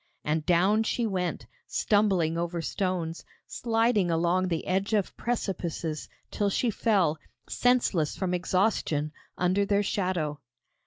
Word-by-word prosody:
And 155 Hz, +1 st, 0 dB
down 190 Hz, +5 st, +4 dB
she 230 Hz, +2 st, 0 dB
went, 185 Hz, -4 st, -2 dB, 0.2 s
stumbling 195 Hz, -7 st, +2 dB
over 170 Hz, 0 st, -2 dB
stones, 170 Hz, -1 st, -2 dB, 0.2 s
sliding 225 Hz, -5 st, +1 dB
along 175 Hz, +3 st, +2 dB
the 165 Hz, -3 st, -2 dB
edge 195 Hz, +4 st, 0 dB
of 205 Hz, -3 st, 0 dB
precipices, 170 Hz, -8 st, -3 dB, 0.2 s
till 205 Hz, -1 st, 0 dB
she 230 Hz, +4 st, +1 dB
fell, 190 Hz, -8 st, +2 dB, 0.3 s
senseless 235 Hz, -11 st, +1 dB
from 185 Hz, -2 st, -1 dB
exhaustion, 180 Hz, -5 st, 0 dB, 0.3 s
under 185 Hz, +3 st, +2 dB
their 200 Hz, 0 st, +2 dB
shadow. 180 Hz, -7 st, -1 dB
185 Hz, 120 wpm, -28 LUFS, 170-205 Hz, 0.3 s, down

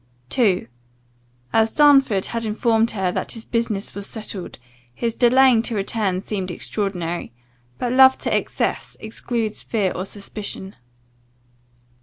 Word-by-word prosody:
II. 200 Hz, -, +2 dB, 0.9 s
"As 225 Hz, 0 st, +3 dB
Darnford 270 Hz, -9 st, +5 dB
had 230 Hz, -1 st, -3 dB
informed 225 Hz, +1 st, +2 dB
her 190 Hz, -5 st, -1 dB
that -, -, -3 dB
his 225 Hz, -2 st, -7 dB
business 225 Hz, -4 st, -2 dB
was 200 Hz, 0 st, -5 dB
settled, 210 Hz, -4 st, -7 dB, 0.4 s
his 230 Hz, -, -1 dB
delaying 255 Hz, 0 st, +5 dB
to 235 Hz, 0 st, -2 dB
return 195 Hz, -2 st, -1 dB
seemed 190 Hz, -2 st, -3 dB
extraordinary; 175 Hz, -, -3 dB, 0.5 s
but 245 Hz, -, -2 dB
love 265 Hz, +1 st, +7 dB
to -, -, -1 dB
excess, -, -, -2 dB
excludes 220 Hz, 0 st, -3 dB
fear 205 Hz, -5 st, 0 dB
or 185 Hz, +2 st, -4 dB
suspicion." 200 Hz, -1 st, -7 dB
220 Hz, 125 wpm, -22 LUFS, 195-235 Hz, 0.9 s, love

